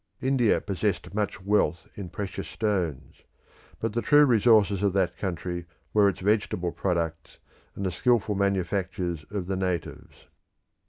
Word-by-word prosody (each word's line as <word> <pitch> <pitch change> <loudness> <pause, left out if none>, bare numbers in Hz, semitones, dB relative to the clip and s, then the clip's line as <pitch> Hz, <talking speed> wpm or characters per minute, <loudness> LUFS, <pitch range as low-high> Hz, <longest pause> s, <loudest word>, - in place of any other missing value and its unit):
India 130 -4 +2
possessed 100 -1 -2
much 100 -1 -2
wealth 100 -4 +1
in 95 -3 -7
precious 100 +1 -5
stones, 95 - -2 0.6
but 115 -1 -2
the 120 - 0
true 145 +3 +6
resources 110 -5 +4
of 100 -2 +2
that 90 -3 +1
country 85 -1 -4 0.3
were 105 -2 +5
its 95 0 -5
vegetable 100 -3 0
products 85 -3 -2 0.4
and 100 - -4
the 95 - 0
skilful 115 +2 +2
manufactures 95 -3 -1
of 100 -3 -3
the 95 +1 -2
natives. 90 -3 -4
100 Hz, 140 wpm, -27 LUFS, 90-105 Hz, 0.6 s, true